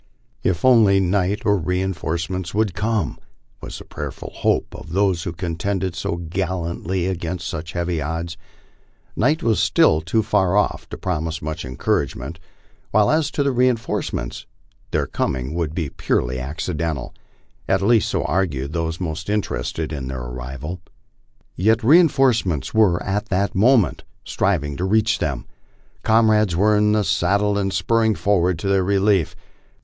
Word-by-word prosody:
If 90 +3 0
only 110 -6 +6
night 95 +2 0
or 100 -1 +4
reinforcements 90 0 -2
would 105 -3 +1
come! 110 +3 -1 0.4
was - - -7
the - - -11
prayerful - - -7
hope - - 0
of 80 - -9
those 95 -3 +2
who 85 - -3
contended 90 +2 -2
so 85 - -2
gallantly 90 +1 -2
against 85 -1 -3
such 80 +1 -5
heavy 85 -2 -1
odds. 80 +2 -3 0.8
Night 150 +8 +1
was 115 -2 +2
still 80 - +4
too 90 +8 0
far 95 -2 +2
off 105 - 0
to - - -6
promise 80 -3 -2
much 80 +3 -5
encouragement; 65 +5 -2 0.5
while 105 0 +3
as 155 -2 +2
to 140 -1 0
reinforcements, 120 - -1 0.4
their - - 0
com - - -1
ing 65 +3 -5
would 80 -2 -2
be 80 -5 -2
purely 65 +1 -1
accidental 80 0 -3 0.6
at - - +2
least 110 0 +3
so - - 0
argued 75 -6 -1
those 80 -1 -2
most 85 0 -4
interested 80 -6 -2
in 70 -3 -4
their 65 -1 -5
arrival. 65 +8 -6 0.7
Yet 110 +5 +2
reinforcements 130 - +3
were 100 -6 +3
at 105 +3 -2
that 100 +1 0
moment 110 - +3 0.2
striving 75 -8 0
to 90 - -3
reach 105 +3 +2
them. - - -2 0.6
Comrades 110 -4 +3
were 105 +4 +3
in 105 0 +3
the 105 -1 +2
saddle 100 +3 +1
and 100 -1 0
spurring 110 +1 +2
forward 90 -3 +1
to 90 - -4
their 95 -1 +3
relief. 100 -2 +2
95 Hz, 145 wpm, -21 LUFS, 80-105 Hz, 0.8 s, only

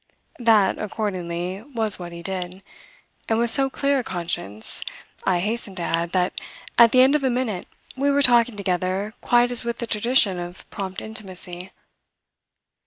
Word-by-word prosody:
That, 220 -5 +4
accordingly, 185 -3 -3
was 225 -6 -1
what 175 -1 -7
he 170 0 -9
did, 185 0 -4 0.7
and 225 - +2
with 235 0 +3
so 270 -1 +4
clear 280 +1 +1
a - - -2
conscience, 165 - -2 0.4
I 180 -2 +2
hasten 210 -1 -2
to 175 - -2
add, 170 +1 -1
that 180 -1 0 0.4
at 235 -1 +8
the 255 - +6
end 265 +2 +6
of 300 -2 +2
a 265 - +3
minute 240 -7 -2 0.3
we 280 +2 +1
were 285 0 +3
talking 240 -2 +5
together 190 +1 -1
quite 240 0 +3
as 245 0 -1
with 235 0 -3
the 235 - -3
tradition 215 -4 +2
of 175 +1 -8
prompt 190 -2 -5
intimacy. 185 -4 -6
205 Hz, 165 wpm, -23 LUFS, 180-240 Hz, 0.7 s, at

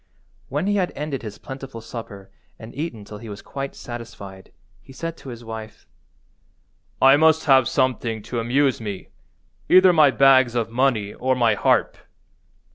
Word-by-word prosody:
When 145 +6 -2
he 205 +1 +1
had 185 -2 0
ended 145 -2 -4
his 105 -3 -8
plentiful 135 -3 -9
supper 105 -4 -9 0.3
and 110 +1 -11
eaten 135 -9 -5
till 105 0 -10
he 115 - -10
was 100 0 -9
quite 135 0 -6
satisfied, 105 -5 -10 0.3
he - - -16
said 165 +4 -5
to 135 - -11
his 120 -1 -9
wife— 110 -1 -9 1.1
"I 135 +1 +6
must 160 +1 +3
have 135 -4 +5
something 120 -5 -1
to 120 - -4
amuse 130 +2 +1
me, 100 -4 -6 0.6
either 185 0 +7
my 155 -4 +6
bags 130 -2 +4
of 115 -2 -1
money 115 -5 0
or 130 +1 0
my 120 -3 +3
harp." 105 - +1
125 Hz, 160 wpm, -22 LUFS, 110-140 Hz, 1.1 s, either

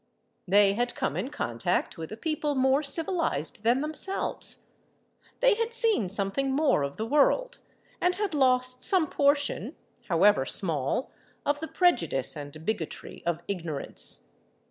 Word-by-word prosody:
They 200 +1 +5
had 240 +3 -1
come - - -1
in 260 - -2
contact 120 - -1
with 160 +2 -7
a 215 - -6
people 300 +1 -1
more 265 +2 +3
civilised 315 - -1
than 240 +4 +2
themselves; 315 +6 -3 0.8
they - - +6
had 460 +2 -2
seen 445 - +2
something 200 +8 0
more 280 - +2
of 140 0 -3
the 220 - -2
world, 400 - +2 0.4
and 360 0 +3
had 405 -2 -2
lost 255 -2 +2
some 370 -4 +3
portion, 285 -1 +1 0.3
however 175 -3 +4
small, 155 - -2 0.3
of 290 0 +1
the 320 - -4
prejudice 170 - +1
and 150 +1 -8
bigotry 205 -7 -4
of 170 -1 0
ignorance. 170 -7 -2
255 Hz, 140 wpm, -28 LUFS, -, 0.8 s, they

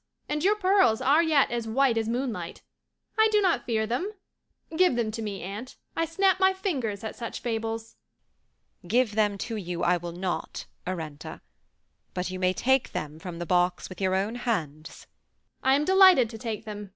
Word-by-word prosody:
And 300 +1 -2
your 405 +3 +4
pearls 375 - +3
are 290 +5 +4
yet 310 -6 +3
as 235 -1 -2
white 255 +2 +2
as 225 -1 -1
moonlight. 245 -1 -3 0.6
I 440 - +7
do 425 - +4
not 375 -4 +1
fear 220 -2 +1
them. 255 - -2 0.6
Give 360 -6 +4
them 230 -2 0
to 225 +1 -5
me, 205 -4 -5
aunt. 205 +7 -7 0.2
I 330 - +1
snap 375 +3 +2
my 380 0 +4
fingers 260 - -3
at 220 - -5
such 230 - -6
fables." 225 -1 -4 0.9
"Give 235 +1 +2
them 205 -2 +1
to 225 -2 -4
you, 175 -3 -4
I 180 +1 +3
will 175 0 -6
not, 180 +1 -4 0.2
Arenta; 160 -5 -6 0.7
but 180 0 -2
you 185 - -5
may 185 0 +2
take 265 +6 +1
them 150 +1 -5
from 175 0 -7
the 175 - -4
box 180 +1 +1
with 185 0 -10
your 190 -1 +2
own 200 +4 0
hands." 165 - -4 0.6
"I 265 +1 +4
am 290 +2 +1
delighted 375 - +6
to 225 - -8
take 225 -1 -5
them. 210 -2 -7
225 Hz, 185 wpm, -27 LUFS, 190-275 Hz, 0.9 s, I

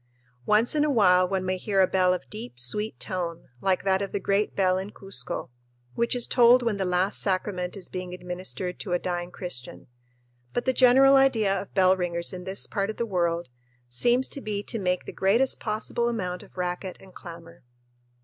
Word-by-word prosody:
Once 215 +3 +3
in 300 -1 +2
a 300 - +1
while 185 -8 +4
one 190 -1 -1
may 185 0 -1
hear 195 +1 -1
a 190 - +7
bell 185 0 +2
of 180 -7 -3
deep, 120 +1 -8
sweet 210 - -1
tone, 175 -4 -4
like 190 -1 +1
that 190 0 +2
of 200 - -3
the 200 - -2
great 200 +2 0
bell 185 -1 +2
in 190 +2 -5
Cuzco, 195 -12 -5 0.4
which 235 +1 0
is 245 - +2
tolled 245 0 +5
when 230 -4 0
the 190 - -1
last 180 +2 0
sacrament 185 -1 -2
is 190 - -5
being 180 -1 -6
administered 180 0 -5
to 185 - -3
a - - +3
dying 175 0 -3
Christian; 175 -9 -7 0.7
but 245 - -1
the 260 - +2
general 265 +2 +6
idea 230 -7 +3
of 200 - -13
bell 185 -1 +5
ringers 170 -1 -3
in 180 -1 -7
this 190 +1 -1
part 200 -1 -2
of 220 - -5
the 235 - -1
world 170 - -1 0.4
seems 240 - +2
to 280 - -4
be 205 -3 -3
to 225 - -3
make 180 -2 -1
the - - -7
greatest 230 +8 +2
possible 220 +2 -1
amount 180 -6 -3
of - - -17
racket 180 +1 -3
and 190 -1 -16
clamor. 170 -1 -11
190 Hz, 200 wpm, -26 LUFS, 180-215 Hz, 0.7 s, a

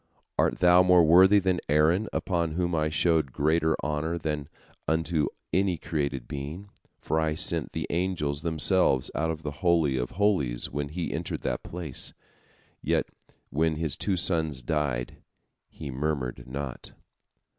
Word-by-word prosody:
Art - - +1
thou 90 0 +6
more 90 -1 +6
worthy 95 +5 +7
than 95 -2 +1
Aaron, 80 +8 +3
unto 85 -4 -1
whom 90 0 0
I 75 -1 +1
showed 80 -2 +2
greater 80 +3 +2
honor 75 +3 -1
than 75 -3 -3 0.4
unto 80 0 +1 0.3
any 95 -1 +2
created 70 -5 -3
being, 75 +8 -6 0.3
for 80 - -1
I 80 -1 0
sent 85 -4 +1
the - - -2
angels 85 -5 -1
themselves 80 -3 +2
out 80 - -1
of 80 -1 -4
the 75 - -3
Holy 80 -7 +3
of 60 0 -3
Holies 90 -12 +1
when 70 +1 -3
he 85 +3 -4
entered - - -4
the - - -2
place? 80 -7 -6 0.7
Yet - - 0 0.4
when 80 +2 +1
his 80 -2 -1
two 95 -3 -1
sons 80 -7 0
died, 70 -4 -2 0.5
he 75 -4 -8
murmured 70 -2 -3
not." 70 0 -6
80 Hz, 145 wpm, -27 LUFS, 75-85 Hz, 0.7 s, worthy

